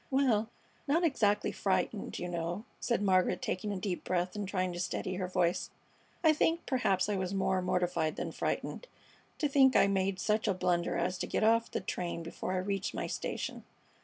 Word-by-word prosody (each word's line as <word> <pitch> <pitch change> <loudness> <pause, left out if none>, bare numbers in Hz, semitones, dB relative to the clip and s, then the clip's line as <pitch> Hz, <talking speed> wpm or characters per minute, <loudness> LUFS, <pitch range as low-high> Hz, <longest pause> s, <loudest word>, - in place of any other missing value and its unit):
"Well, 245 -5 +2 0.4
not 320 +5 +3
exactly 210 -10 +2
frightened, 195 +1 -1
you 180 - -3
know," 175 +4 -3
said 235 -4 0
Margaret, 185 -2 +3
taking 195 +3 -2
a 200 - -2
deep 185 -1 -3
breath 180 +1 -1
and 205 -2 -3
trying 185 -2 -1
to 175 - -5
steady 185 0 -2
her 185 -1 -2
voice. 180 -1 +1 0.5
"I 315 -2 +6
think 325 +2 +1
perhaps 225 -9 +1
I 210 - 0
was 190 0 -2
more 190 -1 +1
mortified 180 -3 0
than - - -3
frightened, - - -3 0.5
to 300 - +1
think 270 -2 +5
I - - +7
made 195 -1 0
such 215 +3 +1
a 200 - +2
blunder 175 -1 +1
as 180 +1 -1
to - - -2
get - - 0
off 230 +1 +4
the - - -3
train 170 -1 -3
before 165 +2 -4
I - - 0
reached 195 +1 -2
my - - -2
station. - - -4
190 Hz, 190 wpm, -32 LUFS, 180-215 Hz, 0.5 s, I